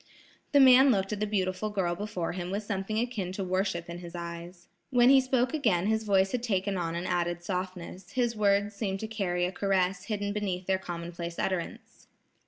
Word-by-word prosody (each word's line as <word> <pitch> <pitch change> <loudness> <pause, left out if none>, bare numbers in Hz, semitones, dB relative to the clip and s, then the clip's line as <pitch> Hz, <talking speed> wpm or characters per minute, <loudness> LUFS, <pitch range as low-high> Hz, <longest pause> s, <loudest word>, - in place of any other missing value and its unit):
The 285 - +5
man 265 0 +8
looked 195 -3 +1
at 205 - -4
the 210 - 0
beautiful 195 0 -1
girl 190 -4 0
before 195 -2 -3
him 180 -1 -5
with 200 +3 -2
something 205 0 -3
akin 225 -6 -2
to 195 - -3
worship 185 -2 -1
in 170 0 -7
his 175 -1 -9
eyes. 170 +1 -7 0.2
When 245 0 +5
he 270 -1 +7
spoke 260 0 +1
again 215 - +1
his 220 +1 0
voice 195 -2 +3
had 250 - -1
taken 200 -4 -1
on 170 -2 -2
an 175 +1 -3
added 175 -1 -1
softness, 185 0 -5
his 240 -2 0
words 205 0 +2
seemed 200 -2 -3
to 220 - -3
carry 185 -5 -1
a 180 - -2
caress 190 -1 0
hidden 205 -2 -2
beneath 190 -3 -2
their 190 0 +1
commonplace 170 -1 -6
utterance. 185 -3 -4
195 Hz, 195 wpm, -29 LUFS, 180-215 Hz, 0.2 s, man